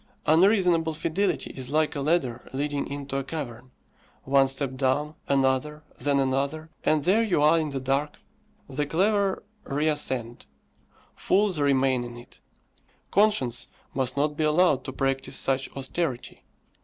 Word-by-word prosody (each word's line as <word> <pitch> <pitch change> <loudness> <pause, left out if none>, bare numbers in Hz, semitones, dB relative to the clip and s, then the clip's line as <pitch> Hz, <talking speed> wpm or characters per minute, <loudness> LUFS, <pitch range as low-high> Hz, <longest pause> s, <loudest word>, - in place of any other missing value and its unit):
Unreasonable 170 -2 +3
fidelity 170 +5 -1
is 130 -1 -7
like 155 +1 +1
a 140 - -2
ladder 135 -6 0
leading 145 +1 -2
into 140 -1 -5
a 135 - -2
cavern 130 -5 -6 0.5
one 135 0 +4
step 135 0 -2
down, 135 +3 0
another, 140 +2 +1 0.2
then 140 +2 +1
another, 140 +4 -1
and 155 -2 +2
there 195 +7 +3
you 215 -9 +1
are 155 +3 +5
in 155 -1 -2
the 140 -1 -3
dark. 135 +3 -1 0.5
The 145 +1 -2
clever 195 +4 +1 0.2
reascend; 140 -5 -1 0.7
fools 195 -4 +1
remain 135 -3 +2
in 120 0 -8
it. 120 - -15 0.7
Conscience 200 - +2 0.3
must 130 0 -1
not 150 +1 +1
be 155 - -1
allowed 155 -3 +3
to - - -4
practise 135 0 -1
such 135 0 0
austerity. 135 -1 -3
145 Hz, 140 wpm, -26 LUFS, 130-160 Hz, 0.7 s, are